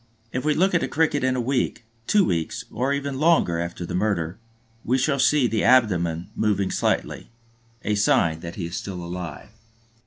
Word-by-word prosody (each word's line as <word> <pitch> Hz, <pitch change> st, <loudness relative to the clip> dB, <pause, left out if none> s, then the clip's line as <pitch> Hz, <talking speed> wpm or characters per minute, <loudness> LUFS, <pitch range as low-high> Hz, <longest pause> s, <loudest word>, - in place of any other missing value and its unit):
If 130 Hz, -, -3 dB
we 150 Hz, 0 st, +2 dB
look 190 Hz, +3 st, +2 dB
at 175 Hz, -, +3 dB
the -, -, -1 dB
Cricket 155 Hz, -3 st, +1 dB
a 130 Hz, -1 st, +1 dB
week, 125 Hz, -1 st, -1 dB, 0.2 s
two 205 Hz, -3 st, +4 dB
weeks, 85 Hz, -, -2 dB
or 130 Hz, +5 st, -1 dB
even 140 Hz, -1 st, -2 dB
longer 155 Hz, -, +3 dB
after 85 Hz, +1 st, -4 dB
the -, -, -6 dB
murder, 90 Hz, -2 st, -1 dB, 0.4 s
we 125 Hz, +3 st, +1 dB
shall 140 Hz, +1 st, +1 dB
see 145 Hz, 0 st, +4 dB
the 110 Hz, -2 st, 0 dB
abdomen 90 Hz, -9 st, +2 dB
moving 100 Hz, -3 st, 0 dB
slightly, -, -, -1 dB, 0.5 s
a 105 Hz, -, 0 dB
sign 85 Hz, -5 st, +2 dB
that 85 Hz, 0 st, -8 dB
he 90 Hz, -, -4 dB
is 85 Hz, -, -6 dB
still 90 Hz, -3 st, -5 dB
alive. 90 Hz, -1 st, -7 dB
110 Hz, 180 wpm, -24 LUFS, 85-140 Hz, 0.5 s, two